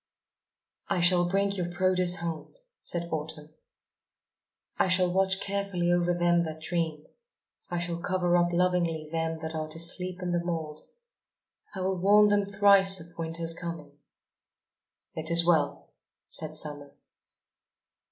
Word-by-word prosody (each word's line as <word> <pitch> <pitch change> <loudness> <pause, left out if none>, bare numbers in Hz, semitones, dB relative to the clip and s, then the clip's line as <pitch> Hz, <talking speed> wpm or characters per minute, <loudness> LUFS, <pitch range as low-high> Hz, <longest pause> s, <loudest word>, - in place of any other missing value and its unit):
"I - - 0
shall 175 0 +4
bring 200 +1 +1
your 180 -3 -2
produce 180 0 +1
home," 170 - -6 0.3
said 170 -1 -1
Autumn. 155 -1 -5 1.3
"I - - +3
shall 180 -1 +2
watch 190 0 +1
carefully 195 -3 -2
over 175 0 +1
them 175 0 +2
that 160 -2 -5
dream, 160 -3 -3 0.6
I 175 - -3
shall 170 0 -3
cover 180 -1 0
up 175 0 +2
lovingly 170 -3 0
them 165 0 -2
that 160 0 -5
are 155 -1 -4
to 155 +1 -8
sleep 180 +2 0
in 180 - -2
the 175 0 -1
mould. 160 -3 -4 0.9
I 190 - -4
will 190 0 -1
warn 210 +2 +5
them 205 0 +2
thrice 200 -1 +4
of 165 +1 -12
Winter's 165 0 0
coming." 165 -4 -8 1.1
"It 160 0 -2
is 170 0 +7
well," 155 -4 0 0.4
said 155 -1 -3
Summer. 145 -2 -3
175 Hz, 140 wpm, -27 LUFS, 160-185 Hz, 1.3 s, is